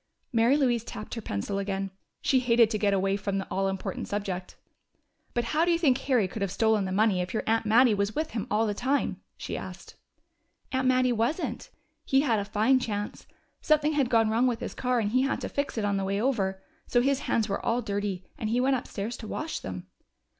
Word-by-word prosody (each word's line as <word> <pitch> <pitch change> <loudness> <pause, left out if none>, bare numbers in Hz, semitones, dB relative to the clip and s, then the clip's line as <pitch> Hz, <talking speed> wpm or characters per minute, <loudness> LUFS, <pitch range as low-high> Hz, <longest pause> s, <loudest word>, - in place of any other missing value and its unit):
Mary 235 +4 +4
Louise 245 -5 +2
tapped 215 -2 -7
her 230 - -4
pencil 195 - -3
again. 195 -1 -2 0.3
She 265 - +4
hated 235 -2 +4
to 215 - -1
get 205 -1 +2
away 195 0 +1
from 200 0 -2
the 195 - -2
all 195 0 +1
important 190 -1 -4
subject. 190 -3 -4 0.8
"But 240 - +1
how 315 +2 +3
do 345 - +2
you 335 - +3
think 275 -6 +3
Harry 250 -8 +2
could 200 +3 -7
have 200 - 0
stolen 220 -2 +2
the 190 - -3
money 200 -1 +3
if 180 +5 -4
your - - 0
aunt 225 0 +1
Mattie 235 +2 +6
was 200 +1 -1
with 310 +1 -1
him 220 - -3
all 215 +2 +2
the 210 - 0
time?" 265 +7 -1 0.2
she - - -5
asked. - - -8 0.8
"Aunt 260 -1 +1
Mattie 255 -1 +3
wasn't. 240 +9 -1 0.3
He 270 0 +3
had 235 -7 +2
a 200 - -3
fine 220 +6 +3
chance. 210 -4 -4 0.3
Something 305 0 +3
had 280 -4 +1
gone 225 -2 +3
wrong 235 +3 +3
with 240 -2 0
his - - -4
car, 250 -1 0
and 210 -2 -1
he 255 +2 +3
had 270 +1 0
to - - -3
fix 285 -3 -2
it 215 - 0
on 200 -1 +1
the 195 - -1
way 200 +1 -1
over. 195 -6 0 0.2
So 245 - +3
his 270 +1 +2
hands 225 -2 +2
were 200 - -3
all 240 +1 0
dirty, 200 -3 -3
and 215 - -2
he 235 +2 +1
went 265 +1 +3
upstairs 225 -1 -5
to 220 - -8
wash 310 +8 -3
them." 90 -1 -6
225 Hz, 225 wpm, -28 LUFS, 200-255 Hz, 0.8 s, Mattie